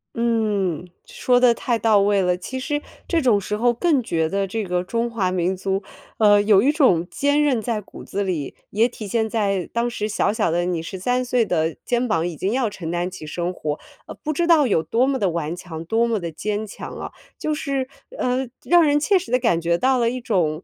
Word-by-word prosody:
嗯， 210 -7 0 0.2
说 245 -1 +1
得 245 -2 +5
太 235 0 -1
到 220 -2 +4
位 200 0 +3
了， 180 -1 +2
其 260 +8 -6
实 295 +2 -2 0.3
这 335 -2 +1
种 230 -6 +3
时 210 +2 -3
候 240 +3 +3
更 290 +2 +2
觉 165 -8 0
得 195 +3 -1
这 220 +3 -3
个 180 -1 -1
中 230 +5 -1
华 195 -5 0
民 185 +1 0
族， 195 +1 -2 0.3
呃， 205 -2 +5
有 205 -2 +5
一 280 +6 +4
种 220 - +3
坚 285 +1 +2
韧 265 -6 +2
在 225 -1 -2
骨 - - -12
子 200 +1 -3
里， 165 -8 -3 0.2
也 220 +3 +3
体 230 -3 -9
现 220 +2 0
在 200 -5 -1
当 235 +1 0
时 225 -3 -3
小 210 - +1
小 195 - +1
的 175 +2 0
你， 175 -2 -1
13 245 +9 -1
岁 245 -2 +1
的 160 -3 0
肩 245 +1 0
膀 170 -5 +1
已 170 - -5
经 190 +6 -2
要 250 -1 +1
承 185 -5 -7
担 175 +1 -1
起 155 -4 -9
生 175 +3 -3
活， 150 -4 -4 0.3
呃， - - -8
不 310 - -1
知 340 +3 0
道 325 -4 +5
有 195 -9 +2
多 235 +9 +1
么 270 -1 0
地 195 - +2
顽 165 -1 -3
强、 165 -2 -8
多 225 +6 +2
么 225 -2 0
地 170 -2 -5
坚 210 +6 -3
强 205 - -8
啊。 - - -6 0.3
就 310 - -2
是， 275 -3 -2 0.3
呃， 255 +1 0 0.2
让 350 -1 +5
人 295 -1 +3
切 380 +6 +3
实 360 - -9
地 250 - +4
感 170 -9 +1
觉 170 +1 +1
到 260 +3 +2
了 230 -1 +2
一 255 +1 -3
种 175 -9 0
210 Hz, 245 characters per minute, -22 LUFS, 180-250 Hz, 0.3 s, 得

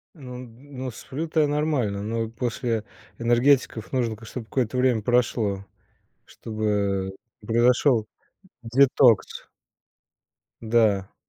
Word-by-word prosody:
Ну 125 -4 -9
ну 130 +2 -8
сплю-то 155 +7 -4
я 150 - +4
нормально, 145 -9 -1
но 115 +1 -2
после 115 -1 -2 0.3
энергетиков 120 -1 +2
нужно, 120 -4 0
конечно, 115 - -14
чтобы 120 -2 -7
какое-то 125 0 -1
время 125 -4 +2
прошло, 110 -4 0 0.6
чтобы 100 -3 -2 0.2
произошел 120 +1 +3 0.6
детокс. 125 -2 +3 1.2
Да. 110 -4 +1
120 Hz, 95 wpm, -24 LUFS, 110-130 Hz, 1.2 s, я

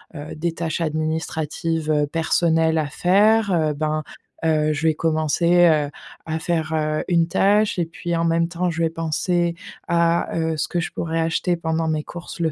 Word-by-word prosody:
heu, 150 +1 -7
des 165 +2 -2
tâches 165 -1 -3
administratives, 160 0 -2
heu, 150 -1 +2
personnelles 160 +1 +1
à 150 - -1
faire, 205 +6 +3
heu, 155 -3 +1
ben, 155 +1 -2 0.4
heu, 155 -1 +2
je 150 +2 -3
vais 160 - +4
commencer, 165 +2 +2
heu, 150 -3 +2 0.4
à 160 0 -1
faire, 160 -1 -1
heu, 155 -1 0
une 170 -1 +3
tâche 205 +2 +2
et 170 - +1
puis 170 +1 -4
en 165 - 0
même 165 0 +2
temps, 180 +1 -1
je 170 0 -3
vais 165 - +2
penser 170 +1 -1 0.3
à, 170 0 +1
heu, 160 -1 0
ce 150 - -1
que 175 - -2
je 170 - -3
pourrais 165 0 -2
acheter 170 +2 0
pendant 160 -1 -1
mes 155 -1 -1
courses 175 +1 -9
le 160 -2 +1
165 Hz, 185 wpm, -22 LUFS, 155-170 Hz, 0.4 s, vais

